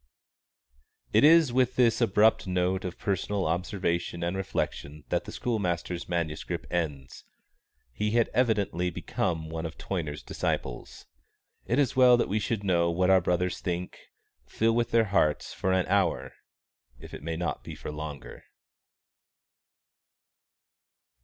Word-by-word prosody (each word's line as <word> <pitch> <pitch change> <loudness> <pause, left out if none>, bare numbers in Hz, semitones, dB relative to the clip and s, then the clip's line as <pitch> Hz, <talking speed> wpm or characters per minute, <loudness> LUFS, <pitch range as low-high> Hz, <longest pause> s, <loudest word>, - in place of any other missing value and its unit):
_It - - +6
is 155 -3 +6
with 130 0 +2
this 120 -1 +3
abrupt 110 -1 +3
note 90 +1 0
of 90 - -5
personal 100 0 -1
observation 85 0 -1
and 85 +2 -1
reflection 75 -5 -3
that - - 0
the - - -7
schoolmaster's 90 -7 -2
manuscript 85 -3 -3
ends. 75 -6 -3 0.7
He 105 +10 -1
had 115 +1 +2
evidently 105 -7 +1
become 80 -1 -2
one 80 0 -5
of 80 -1 -6
Toyner's 80 -6 -4
disciples. 65 -2 -4 0.6
It 120 - +1
is 140 -4 +2
well 125 -1 +7
that 120 - 0
we 105 - +1
should 105 0 -2
know 85 -3 +2
what 90 +2 +2
our 95 -1 +6
brothers 90 +1 0
think, 90 0 -4 0.5
feel 115 +1 +1
with 120 0 +1
their 115 -1 +3
hearts 95 -7 +1
for 95 - -1
an 95 -1 +2
hour, 100 0 +1 0.7
if - - -13
it - - -7
may 80 +2 -4
not 85 -1 -3
be - - -8
for - - -7
longer. 75 -3 -8
90 Hz, 140 wpm, -28 LUFS, 85-110 Hz, 0.7 s, well